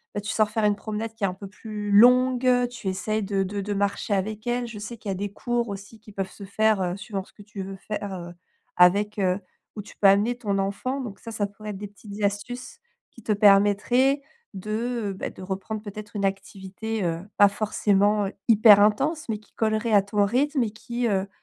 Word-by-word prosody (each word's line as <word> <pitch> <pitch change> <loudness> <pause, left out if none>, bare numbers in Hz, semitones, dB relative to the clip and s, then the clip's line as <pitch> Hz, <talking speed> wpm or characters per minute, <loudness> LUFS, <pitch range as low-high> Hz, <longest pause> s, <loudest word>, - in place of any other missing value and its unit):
Bah, 205 - -1
tu 205 - -4
sors 215 -1 +2
faire 220 +1 -1
une 205 -1 +3
promenade 215 +1 -4
qui 225 - -9
est - - +3
un 180 - -3
peu 200 +1 -9
plus 210 0 -6
longue, 250 +4 +6 0.2
tu 240 -5 -8
essayes 215 +3 -2
de 195 -1 0
de 200 +2 -4
de 205 +1 -3
marcher 200 +1 -1
avec 215 +3 -3
elle. 240 0 0
Je 225 -3 -8
sais 215 +3 -7
qu'il 210 - -7
y - - +1
a - - -4
des 200 +1 -4
cours 240 +2 -2
aussi 200 +2 -8
qui 215 0 -15
peuvent 195 -1 -3
se 200 - -10
faire, 215 0 +2
heu, 180 0 -1
suivant 200 -1 -5
ce - - -22
que 205 - -14
tu 200 -1 -8
veux 195 +1 -7
faire, 205 0 -5
heu, 175 0 -8 0.4
avec, 200 +4 +4
heu, 185 0 +1 0.4
où 210 - -5
tu - - -14
peux 200 - +5
amener 205 +5 +4
ton 205 -5 -1
enfant, 200 +8 -2
donc 205 -6 -7
ça 230 - -8
ça 215 -2 -1
pourrait 210 +1 -10
être 200 - -7
des 205 +1 -6
petites 205 0 -10
astuces 245 - -3 0.3
qui 235 - -15
te 215 - +1
permettraient 205 +7 +4 0.3
de, 215 +2 -3
bah, - - -4
de - - -13
reprendre 195 +3 -4
peut-être 210 0 -9
une 200 -1 0
activité, 195 +2 -4
heu, 165 -1 -1 0.2
pas 205 - +7
forcément 205 0 +1 0.2
hyper 215 -2 +8
intense 270 +10 +2
mais 215 -2 -2
qui 215 - -26
collerait 220 0 0
à 205 - +7
ton 205 +1 +1
rythme 265 +5 +1
et 220 - -3
qui, 235 +3 -3
heu, 195 -2 0
210 Hz, 225 wpm, -25 LUFS, 200-225 Hz, 0.4 s, hyper